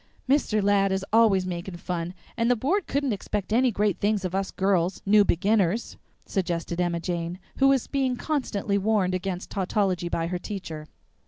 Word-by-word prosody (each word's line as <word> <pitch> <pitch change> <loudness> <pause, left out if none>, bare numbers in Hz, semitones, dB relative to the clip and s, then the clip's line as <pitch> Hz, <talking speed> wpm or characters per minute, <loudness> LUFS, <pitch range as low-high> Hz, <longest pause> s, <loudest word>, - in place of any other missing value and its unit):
"Mr. 255 -6 +2
Ladd 195 -1 +3
is 190 0 -1
always 215 -5 +5
making 175 0 -5
fun, 175 0 -4 0.2
and 235 0 +1
the 245 - +4
Board 330 - 0
couldn't 280 -3 0
expect 205 +1 -3
any 255 +2 +4
great 210 -3 0
things 205 -1 +1
of 180 - -3
us 195 0 -1
girls, 190 -2 +1
new 205 +1 +6
beginners," 200 +3 +1 0.3
suggested 170 -2 -2
Emma 175 -1 0
Jane, 170 0 -3 0.2
who 270 - +5
was 275 -3 +3
being 265 -3 0
constantly 220 -9 -1
warned 195 -3 +1
against 185 0 -3
tautology 190 -2 0
by 165 -1 -1
her 175 +1 -3
teacher. 165 -7 -6
195 Hz, 170 wpm, -26 LUFS, 180-220 Hz, 0.3 s, new